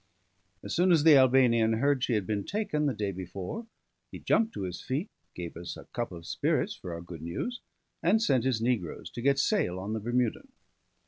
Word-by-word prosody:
As 100 - -4
soon 180 +2 +4
as 160 -4 +5
the 160 -2 +8
Albanian 125 -4 +5
heard 135 +3 +2
she 125 - +1
had 105 -4 +1
been 105 -1 -1
taken 155 - -1
the 140 - +1
day 105 -1 -2
before, 95 - -6 0.4
he - - -7
jumped 225 0 +2
to - - -3
his 90 -1 -5
feet, 145 +10 -3 0.2
gave 85 -1 -6
us 85 +1 -6
a - - -11
cup 120 -3 -2
of 85 -1 -9
spirits - - 0
for 90 - -8
our 85 - -7
good 85 -2 -9
news, 85 - -4 0.4
and 195 +6 +4
sent 135 - +2
his 130 -4 0
negroes 115 -10 -2
to 120 - -6
get 140 +2 +3
sail 140 - +1
on 100 +3 -4
the 110 - -1
Bermudan. 120 +1 -1
120 Hz, 205 wpm, -29 LUFS, 95-145 Hz, 0.4 s, the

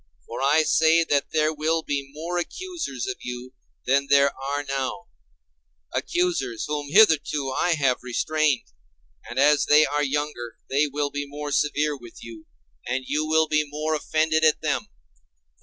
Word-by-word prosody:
For 115 - -6
I 145 +4 +4
say 160 +2 +4
that 145 -3 0
there 155 0 +1
will 160 +2 0
be 140 -2 -3
more 170 +4 -3
accusers 325 - -5
of 130 - -4
you 125 +1 -7 0.3
than 140 +2 +2
there 140 0 +4
are 140 +2 -3
now; 135 -7 -4 0.8
accusers 150 -10 -1
whom 145 -1 -4
hitherto 150 -7 +4
I 175 +5 +1
have 135 -4 +1
restrained: 145 +2 0 0.6
and - - -7
as 145 +2 +4
they 150 +1 +6
are 145 +1 -1
younger 140 -5 -3 0.2
they 145 +2 +2
will 145 0 -2
be 145 0 -4
more 145 +1 -6
severe 150 +1 +1
with 120 -4 -13
you, 115 -2 -11 0.4
and 130 +2 -2
you 155 +1 -1
will 160 0 +3
be 155 0 +2
more 150 +2 -3
offended 155 +1 0
at 155 -1 +3
them. - - -1
145 Hz, 155 wpm, -24 LUFS, 135-155 Hz, 0.8 s, they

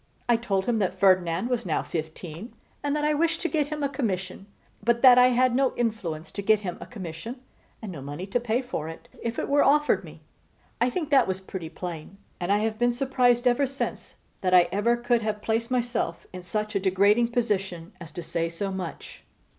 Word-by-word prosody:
I 240 - +5
told 200 -5 -1
him 235 -2 +1
that 190 -2 -1
Ferdinand 185 0 +3
was 245 -2 -1
now 165 -4 -1
fifteen, 160 +5 -6 0.3
and 285 0 0
that 300 0 0
I 300 - +3
wished 325 +2 +1
to 350 - 0
get 305 -4 0
him 300 -1 -4
a - - +3
commission; 195 -8 -3 0.4
but 235 +2 +1
that 250 -1 +9
I 250 - +7
had 255 0 +3
no 265 0 +2
influence 195 -9 -2
to 200 - -4
get 215 +1 +3
him 180 -4 -5
a - - -8
commission, 200 +3 -7 0.4
and 210 - -5
no 150 -6 -7
money 145 +6 -6
to 200 +5 0
pay 240 +2 0
for 160 -10 -4
it 165 - -11
if 230 -1 -3
it - - -2
were 285 +1 +4
offered 295 +2 +3
me. - - -12 0.6
I 245 - +4
think 310 +2 -3
that 275 - +5
was 190 0 -2
pretty 190 -3 -7
plain; 175 +1 -7 0.2
and 175 +2 -1
I 205 - +4
have 220 0 -1
been 240 0 +3
surprised 245 -1 +2
ever 250 +3 +3
since 275 +2 -5 0.3
that 185 -1 +3
I 175 -1 +6
ever 230 +4 +2
could 240 -1 +1
have 215 -1 -3
placed 230 +1 0
myself 240 -9 -1
in 185 - -6
such 210 +4 -3
a 200 - +1
degrading 200 +5 +3
position 195 -8 -2
as 165 -1 -9
to 175 - -6
say 165 +1 -2
so 195 +4 -3
much. 185 -3 -7
215 Hz, 215 wpm, -26 LUFS, 185-245 Hz, 0.6 s, that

